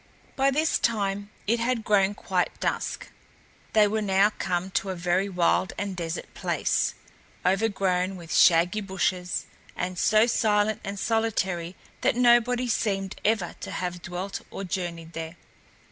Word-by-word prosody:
By 270 Hz, 0 st, +3 dB
this 305 Hz, +4 st, +1 dB
time 205 Hz, -2 st, -1 dB, 0.2 s
it 230 Hz, +3 st, +1 dB
had 235 Hz, -1 st, 0 dB
grown 205 Hz, -1 st, +3 dB
quite -, -, -1 dB
dusk. -, -, -2 dB, 0.6 s
They 215 Hz, -1 st, +6 dB
were 215 Hz, +1 st, -1 dB
now 200 Hz, 0 st, +3 dB
come 185 Hz, -2 st, -2 dB
to 195 Hz, -, -1 dB
a 190 Hz, -, -2 dB
very 180 Hz, +3 st, 0 dB
wild 180 Hz, 0 st, +1 dB
and 200 Hz, -2 st, -3 dB
desert 170 Hz, -1 st, -5 dB
place, -, -, 0 dB, 0.5 s
overgrown 190 Hz, -1 st, +1 dB
with 170 Hz, -2 st, -7 dB
shaggy 175 Hz, +5 st, +5 dB
bushes 185 Hz, -2 st, -1 dB, 0.3 s
and 180 Hz, 0 st, -3 dB
so 215 Hz, +1 st, +5 dB
silent 215 Hz, -2 st, +1 dB
and 200 Hz, +1 st, -5 dB
solitary 190 Hz, -7 st, -1 dB, 0.3 s
that -, -, +2 dB
nobody 245 Hz, 0 st, +4 dB
seemed 195 Hz, -4 st, -1 dB
ever 210 Hz, -5 st, +1 dB
to -, -, -6 dB
have 180 Hz, -1 st, -4 dB
dwelt 185 Hz, +2 st, -5 dB
or -, -, -6 dB
journeyed 170 Hz, -3 st, -4 dB
there. 165 Hz, +1 st, -6 dB
195 Hz, 145 wpm, -26 LUFS, 180-215 Hz, 0.6 s, They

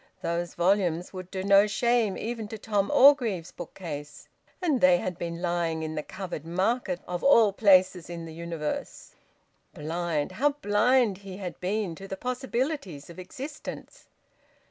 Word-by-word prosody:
Those 170 Hz, 0 st, -2 dB
volumes 180 Hz, -1 st, +1 dB
would 185 Hz, -1 st, -7 dB
do 190 Hz, -1 st, -4 dB
no 200 Hz, +1 st, +6 dB
shame 235 Hz, -2 st, +1 dB
even 225 Hz, -1 st, -4 dB
to 220 Hz, -, -7 dB
Tom 205 Hz, -2 st, 0 dB
Orgreave's 235 Hz, -, +5 dB
bookcase. 150 Hz, -4 st, -8 dB, 0.3 s
And 310 Hz, -9 st, +1 dB
they 180 Hz, -1 st, +6 dB
had 180 Hz, 0 st, -3 dB
been 170 Hz, 0 st, -4 dB
lying 170 Hz, -2 st, -1 dB
in 155 Hz, 0 st, -4 dB
the 155 Hz, -, -2 dB
Covered 180 Hz, -2 st, -7 dB
Market, 210 Hz, +11 st, -1 dB
of 175 Hz, -1 st, -4 dB
all 230 Hz, -7 st, +6 dB
places 185 Hz, -4 st, +4 dB
in 170 Hz, -1 st, -6 dB
the 160 Hz, -, -9 dB
universe... 165 Hz, -2 st, -5 dB, 0.6 s
Blind! 160 Hz, 0 st, -2 dB
How 280 Hz, +10 st, +1 dB
blind 225 Hz, -3 st, +2 dB
he 195 Hz, -2 st, -9 dB
had 185 Hz, -3 st, -6 dB
been 195 Hz, -1 st, -1 dB
to 195 Hz, +4 st, -10 dB
the 195 Hz, -, -5 dB
possibilities 250 Hz, -, -3 dB
of 170 Hz, -, -12 dB
existence! 275 Hz, +11 st, -8 dB
185 Hz, 150 wpm, -27 LUFS, 170-225 Hz, 0.6 s, no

